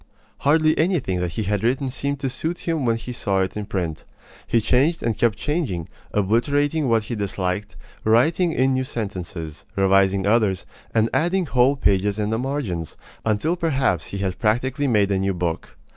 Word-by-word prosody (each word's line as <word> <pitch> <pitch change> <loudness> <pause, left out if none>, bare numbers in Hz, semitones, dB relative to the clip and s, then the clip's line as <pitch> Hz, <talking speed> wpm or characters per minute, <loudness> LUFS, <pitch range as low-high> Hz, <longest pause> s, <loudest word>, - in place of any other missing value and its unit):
Hardly 155 +2 +3
anything 155 - +1
that 90 -1 -2
he 110 - -2
had 105 0 -1
written 130 +3 +1
seemed 140 +2 -2
to 135 - 0
suit 165 +7 -4
him 160 -6 0
when 115 - +3
he 125 +2 -6
saw 100 -5 0
it 95 - -2
in 105 -1 -4
print. 85 -5 -3 0.4
He 115 - +3
changed 140 +9 +2
and 115 -2 0
kept 115 -1 +1
changing, 145 - -2 0.2
obliterating 140 +8 +1
what 115 -2 +3
he 115 - -5
disliked, 100 -2 -2 0.3
writing 155 +11 +3
in 135 -3 +2
new 130 0 +1
sentences, 90 - -5
revising 95 0 +3
others, 105 -3 +2 0.3
and 110 0 +3
adding 175 +3 +1
whole 130 0 +3
pages 100 -5 +1
in 105 0 -1
the 110 - 0
margins, 120 - -3 0.3
until 110 +11 +1
perhaps 135 - 0
he 100 - -5
had 95 -2 -2
practically 130 +6 +1
made 105 -5 +3
a 95 - +2
new 95 0 0
book. 85 -2 -3
115 Hz, 175 wpm, -23 LUFS, 95-140 Hz, 0.4 s, Hardly